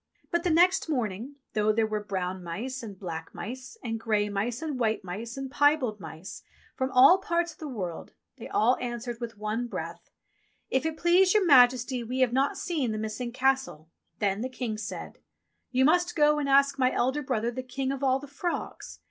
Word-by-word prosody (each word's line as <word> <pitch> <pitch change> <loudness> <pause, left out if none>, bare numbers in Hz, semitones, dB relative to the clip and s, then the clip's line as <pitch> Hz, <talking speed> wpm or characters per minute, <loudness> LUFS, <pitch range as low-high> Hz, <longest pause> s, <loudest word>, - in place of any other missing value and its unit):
But 345 - +1
the 360 - +1
next 350 +2 +4
morning, 240 -1 -2 0.2
though 215 0 +2
there 220 +1 +2
were 215 -1 -3
brown 185 -2 -3
mice, 240 +11 -5
and 205 -4 -8
black 165 -4 -7
mice, 260 +3 -7
and 225 -2 -3
grey 210 -2 0
mice, 220 +7 -2
and 295 -5 -3
white 220 -3 0
mice, 220 +7 -6
and 270 -1 -5
piebald 290 -7 +2
mice, 165 -1 -9 0.3
from 260 0 -1
all 275 +9 +7
parts 345 -3 -1
of - - -27
the 310 - -6
world, 185 - -5 0.3
they 235 - -8
all 245 +4 +3
answered 240 -1 -5
with 230 -3 -6
one 215 +3 -2
breath: - - -7 0.6
"If 265 +4 +1
it 320 -1 -4
please 360 +3 +4
your 415 -3 +4
Majesty, 250 -3 +5
we 255 +3 -2
have 250 -2 +3
not 270 +2 +1
seen 300 -10 -1
the 215 - -3
missing 220 +3 -4
Castle." 260 -11 0 0.3
Then 200 0 0
the 255 - -2
King 250 -4 -4
said, - - -7 0.5
"You 260 0 +3
must 350 +3 +3
go 300 -1 +4
and 285 -1 -1
ask 275 0 +4
my 255 0 +3
elder 265 +4 0
brother 240 -4 -1
the 255 +2 -4
King 260 +1 -3
of 275 0 -4
all 260 -1 +3
the 280 - -9
Frogs. 310 +5 -5
250 Hz, 200 wpm, -28 LUFS, 215-275 Hz, 0.6 s, all